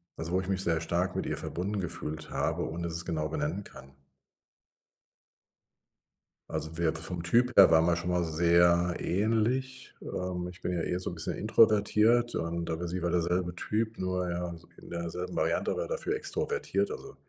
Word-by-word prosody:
also 80 +1 -5
wo 95 - +3
ich 95 - -7
mich 95 -1 0
sehr 85 -1 +1
stark 90 +3 0
mit - - -1
ihr - - -1
verbunden 100 +4 -3
gefühlt 80 -2 -5
habe 80 +4 -1
ohne 85 +2 -5
dass 85 -1 -3
ich 85 - -2
es - - -6
genau 75 -1 -1
benennen 80 +6 -2
kann. 65 0 -13 2.6
Also 80 +1 -4
wir 80 -2 +2
vom 85 +2 -4
Typ 120 +8 +3
her 95 - +10
waren 80 0 +5
wir 85 -1 +3
schon 85 +1 -3
mal 90 -1 +2
sehr 85 +2 +3
ähnlich. 115 +7 0
Ähm, 90 -1 -3
ich 90 - -13
bin 90 - -1
ja 85 - -1
eher 90 +2 -1
so 90 - -3
'n - - -7
bisschen 80 -1 -3
introvertiert 110 +2 +4
und 85 0 -2
aber 85 +2 -3
sie 90 +1 -3
war 85 - +1
derselbe 90 +1 0
Typ. 110 +3 -2
Nur, 90 -1 -1
ja, 85 0 -3 0.2
in - - -13
derselben 85 +1 -4
Variante, - - +1
aber - - -1
dafür 485 -4 -2
extrovertiert. 460 +1 -1
Also, 420 -2 -8
90 Hz, 185 wpm, -30 LUFS, 85-100 Hz, 2.6 s, her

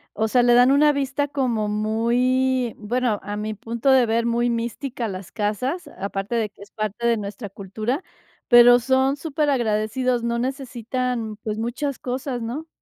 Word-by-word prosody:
o 220 +1 +1
sea, 245 +2 +3
le 240 0 +5
dan 245 +2 +6
una 295 +2 +5
vista 280 0 -1
como 250 -7 -1
muy 240 +4 +1
bueno, 225 0 0
a 205 - -5
mi 215 +1 -3
punto 230 +5 -2
de 260 -2 +5
ver, 230 +1 +1
muy 235 +1 +1
mística 235 +2 -3
a - - -1
las 185 -1 -7
casas, 250 - -2
aparte 200 +3 -3
de 225 -2 0
que 200 - -21
es 205 - -16
parte 215 +2 -2
de 235 -1 +3
nuestra 205 +1 -6
cultura, 215 - -4 0.5
pero 240 0 +8
son 265 +2 +2
superagradecidos, 255 -5 0
no 235 0 0
necesitan, 250 -3 -3
pues, 215 0 -4
muchas 255 +4 -2
cosas, 255 -1 -3
¿no? 275 +8 -5
240 Hz, 170 wpm, -23 LUFS, 215-260 Hz, 0.5 s, pero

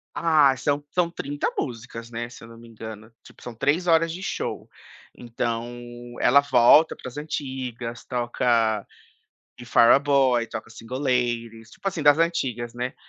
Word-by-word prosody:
Ah, 150 -5 +4
são 145 +3 -1
são 175 -2 +1
30 145 -3 -3
músicas, 115 -3 -5
né, 120 0 -5
se 120 - -13
eu - - -11
não 115 0 -13
me 115 0 -14
engano. 110 -1 -10
Tipo, - - -17
são 120 - -8
3h 165 +5 +2
de 180 - -7
show, - - -4 0.5
então 115 0 -3 0.5
ela 135 +3 +6
volta 140 +3 +5
para - - -8
as 125 - -13
antigas, 130 -5 -5
toca 120 -3 0 0.7
The 120 - -11
Fireboy, 130 0 +4
toca 110 0 -7
Single 115 +3 -7
Ladies, 120 -4 -1
tipo - - -19
assim, 185 -5 -1
das 145 0 +6
antigas, 130 -8 -1
né, 125 +1 -4
125 Hz, 150 wpm, -24 LUFS, 115-145 Hz, 0.7 s, ela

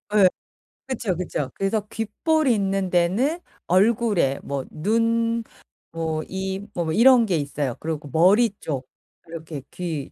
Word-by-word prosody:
예. 195 -3 +7 0.6
그쵸, 230 -8 -2
그쵸. 160 -6 -3
그래서 195 +2 0
귓불 280 +9 0
있는 195 -5 +1
데는 195 - +1 0.3
얼굴에 195 - +2
뭐 140 -1 -3
눈 230 +5 +1 0.5
뭐 160 -1 -2
이 190 +1 -4
뭐 170 -2 -2
이런 240 +3 +6
게 185 -6 +1
있어요. 140 -3 -2
그리고 155 -2 -4
머리 195 - +5
쪽 135 -4 -4 0.4
이렇게 160 -3 -7
귀 165 -6 -4
190 Hz, 225 characters per minute, -23 LUFS, 160-225 Hz, 0.6 s, 예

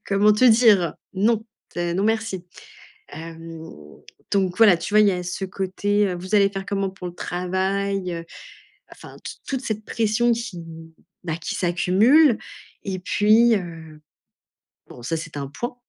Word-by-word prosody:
comment 205 +1 +4
te 210 +5 +2
dire? 220 -8 +5 0.2
Non, 220 +3 +1 0.3
c'est 175 0 -2
non 195 - 0
merci. 220 -5 -1 0.7
Hem, 165 +1 -9 0.7
donc 190 -2 +1
voilà, 220 -5 +7
tu 205 - -6
vois, 215 - +6
il 210 - +5
y - - +4
a 180 -1 -3
ce 180 +2 -4
côté, 200 +2 -1
heu: 180 - -3
«Vous 185 +4 -2
allez 200 -1 +5
faire 195 -1 -6
comment 195 -1 -1
pour 185 -1 -8
le 175 - -8
travail, 190 +1 -2
heu?» 165 0 -6 0.7
Enfin - - -13
t - - -5 0.2
toute 265 -1 -2
cette 215 -2 -4
pression 230 +1 +1
qui, 230 -6 -4
mmh, 165 0 -11 0.3
bah, 160 -2 -2
qui 160 - -5
s'accumule. 215 - +4 0.5
Et 190 -2 -3
puis, 215 +5 +4
heu, 165 -4 -8 0.9
bon 120 - -13
ça 165 +7 -2
c'est 155 -1 -8
un 140 -1 -4
point, 240 - -5
195 Hz, 165 wpm, -23 LUFS, 175-215 Hz, 0.9 s, voilà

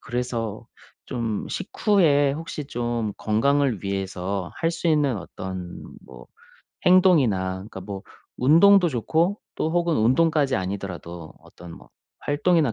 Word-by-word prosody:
그래서 120 -3 -4 0.4
좀 115 -4 -3
식후에 160 -10 +2
혹시 155 -1 -6
좀 120 -4 -2
건강을 125 +1 +1
위해서 95 -1 -3
할 165 0 0
수 170 - -4
있는 145 -6 +2
어떤 95 -1 -7 0.2
뭐 - - -13 0.6
행동이나 155 - +4
그러니까 95 0 -9
뭐 95 -1 -7 0.4
운동도 175 +7 +6
좋고 160 - 0 0.2
또 160 - -1
혹은 170 -2 +1
운동까지 135 +4 +2
아니더라도 90 -4 -6
어떤 85 -1 -13
뭐 - - -14 0.3
활동이나 150 -3 +1
125 Hz, 265 characters per minute, -24 LUFS, 100-160 Hz, 0.6 s, 운동도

